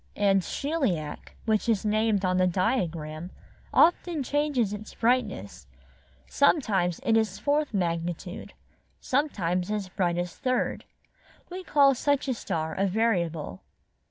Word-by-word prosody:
''And 195 Hz, -1 st, +3 dB
Sheliak, 205 Hz, -, -2 dB
which 220 Hz, 0 st, +1 dB
is 220 Hz, -2 st, +1 dB
named 215 Hz, -2 st, +1 dB
on 185 Hz, 0 st, +1 dB
the 185 Hz, 0 st, +3 dB
diagram, 170 Hz, -5 st, -1 dB, 0.4 s
often 335 Hz, -2 st, +3 dB
changes 280 Hz, -7 st, 0 dB
its 210 Hz, +1 st, -8 dB
brightness; 210 Hz, -, -1 dB, 0.6 s
sometimes 200 Hz, -, +2 dB
it 225 Hz, -, +2 dB
is 215 Hz, -3 st, +1 dB
fourth 290 Hz, +7 st, 0 dB
magnitude; 175 Hz, -1 st, -3 dB, 0.5 s
sometimes 185 Hz, -, -1 dB
as 210 Hz, -3 st, -2 dB
bright 175 Hz, -2 st, 0 dB
as 175 Hz, 0 st, -3 dB
third. 255 Hz, -2 st, -1 dB, 0.7 s
We 370 Hz, +1 st, -6 dB
call 280 Hz, -5 st, +5 dB
such 285 Hz, +2 st, 0 dB
a 260 Hz, -, +1 dB
star 160 Hz, -8 st, -3 dB
a 195 Hz, +1 st, +1 dB
variable." 175 Hz, -, -1 dB
205 Hz, 125 wpm, -27 LUFS, 175-255 Hz, 0.7 s, call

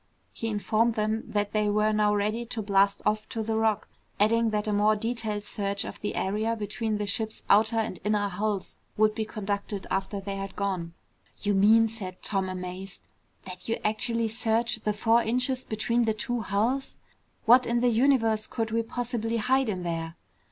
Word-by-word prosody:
He 225 Hz, -, -4 dB
informed 220 Hz, +2 st, +1 dB
them 215 Hz, 0 st, -1 dB
that 205 Hz, -1 st, -1 dB
they 210 Hz, -1 st, +1 dB
were 210 Hz, +1 st, +2 dB
now 210 Hz, -1 st, +2 dB
ready 210 Hz, +3 st, 0 dB
to 230 Hz, -2 st, -4 dB
blast 200 Hz, 0 st, +2 dB
off 215 Hz, +1 st, 0 dB
to 225 Hz, -, -3 dB
the 220 Hz, 0 st, -1 dB
Rock, 220 Hz, -1 st, +1 dB, 0.3 s
adding 230 Hz, +2 st, +3 dB
that 210 Hz, 0 st, -1 dB
a 210 Hz, -, +1 dB
more 210 Hz, +1 st, +4 dB
detailed 220 Hz, -1 st, -2 dB
search 200 Hz, -1 st, -2 dB
of -, -, -8 dB
the 205 Hz, -, -3 dB
area 215 Hz, +4 st, 0 dB
between 215 Hz, 0 st, -2 dB
the 210 Hz, -, -2 dB
ship's 220 Hz, +2 st, -2 dB
outer 220 Hz, +3 st, +5 dB
and 220 Hz, -4 st, -1 dB
inner 210 Hz, -1 st, +1 dB
hulls 200 Hz, +1 st, -2 dB, 0.2 s
would 215 Hz, 0 st, +4 dB
be 220 Hz, 0 st, -2 dB
conducted 200 Hz, -1 st, -3 dB
after 195 Hz, +1 st, -1 dB
they 195 Hz, 0 st, -5 dB
had 195 Hz, -1 st, -6 dB
gone. 185 Hz, -4 st, -2 dB, 0.5 s
"You 205 Hz, -1 st, +2 dB
mean," 220 Hz, +3 st, +5 dB
said 195 Hz, -5 st, -7 dB
Tom, 195 Hz, -2 st, -1 dB
amazed, 185 Hz, +1 st, -6 dB, 0.4 s
"that 185 Hz, +2 st, -8 dB
you 230 Hz, -, 0 dB
actually 230 Hz, +1 st, 0 dB
search 230 Hz, +1 st, 0 dB
the 215 Hz, -1 st, -1 dB
four 225 Hz, +3 st, +3 dB
inches 250 Hz, +3 st, +1 dB
between 235 Hz, +2 st, 0 dB
the 220 Hz, -1 st, +1 dB
two 240 Hz, +2 st, -2 dB
hulls? 230 Hz, +7 st, -1 dB, 0.5 s
What 245 Hz, +3 st, +6 dB
in 235 Hz, 0 st, +1 dB
the 245 Hz, -, +4 dB
universe 225 Hz, -3 st, +2 dB
could 225 Hz, -1 st, -3 dB
we 230 Hz, +1 st, +2 dB
possibly 230 Hz, -1 st, -2 dB
hide 255 Hz, +2 st, +2 dB
in 185 Hz, -3 st, -3 dB
there?" 165 Hz, -1 st, -3 dB
215 Hz, 185 wpm, -27 LUFS, 200-225 Hz, 0.5 s, What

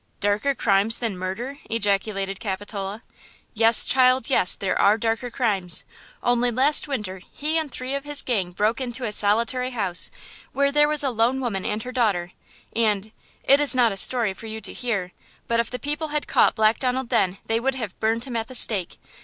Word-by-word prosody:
"Darker 205 Hz, +7 st, 0 dB
crimes 205 Hz, 0 st, +3 dB
than 230 Hz, -5 st, -3 dB
murder!" 220 Hz, +10 st, -5 dB
ejaculated 195 Hz, -2 st, -1 dB
Capitola. 200 Hz, +1 st, -5 dB, 0.5 s
"Yes, 225 Hz, +1 st, +5 dB
child, 255 Hz, -1 st, +3 dB
yes; 185 Hz, -8 st, +3 dB
there 195 Hz, -, -2 dB
are 205 Hz, +2 st, +4 dB
darker 225 Hz, +2 st, -2 dB
crimes. 200 Hz, -9 st, -2 dB, 0.4 s
Only 245 Hz, 0 st, +2 dB
last 265 Hz, +7 st, +2 dB
winter 205 Hz, -9 st, -4 dB
he 305 Hz, +2 st, -2 dB
and 310 Hz, -3 st, -4 dB
three 255 Hz, +2 st, -5 dB
of 280 Hz, 0 st, -3 dB
his 290 Hz, -1 st, +1 dB
gang 200 Hz, -8 st, -1 dB
broke 210 Hz, +7 st, -1 dB
into 245 Hz, 0 st, -3 dB
a 215 Hz, -, -2 dB
solitary 230 Hz, +5 st, +2 dB
house 200 Hz, -8 st, +1 dB, 0.4 s
where 280 Hz, 0 st, +1 dB
there 295 Hz, +1 st, +4 dB
was 300 Hz, -1 st, +2 dB
a 270 Hz, -, 0 dB
lone 235 Hz, +3 st, +1 dB
woman 220 Hz, -7 st, -3 dB
and 210 Hz, +1 st, -3 dB
her 255 Hz, -, -6 dB
daughter, 200 Hz, -9 st, 0 dB, 0.4 s
and–it 220 Hz, +5 st, 0 dB
is 290 Hz, -2 st, +4 dB
not 240 Hz, -3 st, +4 dB
a -, -, -4 dB
story 225 Hz, 0 st, +2 dB
for 225 Hz, -, -10 dB
you 220 Hz, 0 st, -6 dB
to -, -, -3 dB
hear; 200 Hz, -7 st, -2 dB, 0.4 s
but 230 Hz, 0 st, +1 dB
if 235 Hz, -, 0 dB
the 250 Hz, -, -4 dB
people 295 Hz, +4 st, -3 dB
had 300 Hz, 0 st, -2 dB
caught -, -, +3 dB
Black 220 Hz, 0 st, +2 dB
Donald 255 Hz, -1 st, -1 dB
then 185 Hz, 0 st, +1 dB
they 225 Hz, 0 st, 0 dB
would 265 Hz, +3 st, -1 dB
have 225 Hz, -7 st, -6 dB
burned 225 Hz, +1 st, 0 dB
him 250 Hz, -2 st, -7 dB
at 225 Hz, -1 st, -2 dB
the 255 Hz, -, -7 dB
stake! 200 Hz, -8 st, +1 dB
230 Hz, 195 wpm, -23 LUFS, 205-255 Hz, 0.5 s, Yes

